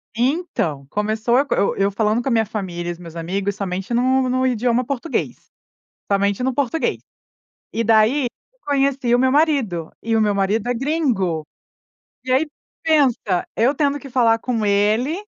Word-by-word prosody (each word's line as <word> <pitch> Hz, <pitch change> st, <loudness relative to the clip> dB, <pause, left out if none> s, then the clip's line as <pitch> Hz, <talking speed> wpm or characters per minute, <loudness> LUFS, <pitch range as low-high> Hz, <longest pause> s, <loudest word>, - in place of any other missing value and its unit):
Então, 240 Hz, -, -1 dB
começou 220 Hz, +5 st, 0 dB
eu 280 Hz, -, +3 dB
co -, -, -1 dB
eu -, -, +1 dB
eu 195 Hz, +1 st, +2 dB
falando 215 Hz, +3 st, +1 dB
com 270 Hz, -, -6 dB
a -, -, +1 dB
minha 225 Hz, -1 st, +3 dB
família 180 Hz, -5 st, -4 dB
e -, -, 0 dB
os 170 Hz, -, -7 dB
meus 170 Hz, -1 st, -11 dB
amigos, 195 Hz, +4 st, -2 dB
somente 195 Hz, +2 st, -4 dB
no 260 Hz, +2 st, +2 dB
no 255 Hz, +1 st, +1 dB
idioma 245 Hz, 0 st, +1 dB
português, 280 Hz, +4 st, -3 dB, 0.6 s
somente 200 Hz, +3 st, +1 dB
no 260 Hz, 0 st, 0 dB
português. 285 Hz, +4 st, -1 dB, 0.7 s
E 230 Hz, -, 0 dB
daí, 225 Hz, +5 st, +3 dB
eu -, -, -9 dB
conheci 275 Hz, -3 st, +1 dB
o -, -, +4 dB
meu 260 Hz, +1 st, +3 dB
marido, 270 Hz, -, +1 dB
e 225 Hz, 0 st, -1 dB
o 220 Hz, -, +3 dB
meu 210 Hz, -1 st, +2 dB
marido 200 Hz, +4 st, 0 dB
é 245 Hz, -, +1 dB
gringo. 230 Hz, -, 0 dB, 0.8 s
E 255 Hz, -, -6 dB
aí, 285 Hz, +5 st, +3 dB, 0.4 s
pensa! 260 Hz, -, +2 dB
Eu 250 Hz, +6 st, +3 dB
tendo 285 Hz, 0 st, +1 dB
que 275 Hz, -2 st, -11 dB
falar 230 Hz, -3 st, +3 dB
com 235 Hz, -4 st, -1 dB
ele, 215 Hz, -, +1 dB
235 Hz, 175 wpm, -21 LUFS, 200-265 Hz, 0.8 s, o